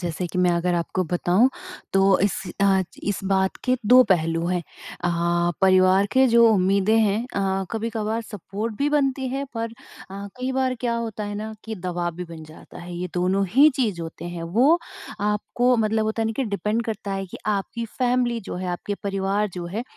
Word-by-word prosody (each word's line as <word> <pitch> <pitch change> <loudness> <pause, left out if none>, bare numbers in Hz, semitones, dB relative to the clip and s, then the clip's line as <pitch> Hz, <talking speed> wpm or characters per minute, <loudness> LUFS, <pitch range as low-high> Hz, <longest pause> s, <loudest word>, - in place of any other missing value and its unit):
जैसे 175 0 -3
कि - - -2
मैं 180 -1 +4
अगर 175 +1 0
आपको 175 +2 -1
बताऊँ, 180 +7 +3 0.4
तो 195 0 +4
इस 200 0 0 0.2
अ, 195 -1 +4
च - - -7 0.3
इस 200 - -2
बात 190 0 +1
के 255 0 +2
2 250 +3 +8
पहलू 165 -1 +2
हैं। 180 0 0 0.4
अ, 175 - +2 0.5
परिवार 185 +1 +5
के 265 0 +5
जो 235 0 +6
उम्मीदें 200 +1 +3
हैं 210 -2 +2 0.2
अ, 195 -1 0
कभी-कभार 225 0 -2
सपोर्ट 210 +1 -5
भी 285 - +2
बनती 270 -3 +1
है, 270 +2 -2
पर 230 0 -3 0.4
अ, 200 +1 -6
कई 255 +1 -3
बार 260 -1 +1
क्या 235 -2 0
होता 225 -2 -4
है 205 0 -5
ना 215 +1 -5
कि 225 - -5
दबाव 175 -2 -3
भी 180 - -5
बन 165 -2 -10
जाता 155 +1 -13
है। 175 0 -8
ये 180 +1 -3
दोनों 185 +2 +1
ही 285 +4 +8
चीज़ 215 -10 0
होते 165 +1 -8
हैं 175 -1 -5
वो 290 +8 +5 0.4
आपको, 210 +4 +1
मतलब 220 0 +1
होता 220 +1 -1
है - - 0
ना 225 - -1
कि 270 - 0
डिपेंड 210 +2 -1
करता 210 -3 -4
है 195 0 -3
कि 185 - -9
आपकी 210 +3 -2
फ़ैमिली 245 -2 +1
जो 190 - -6
है, 185 +1 -4
आपके 180 +3 -3
परिवार 195 +1 0
जो 175 -1 -5
है, 225 - -1
200 Hz, 200 wpm, -23 LUFS, 185-230 Hz, 0.5 s, 2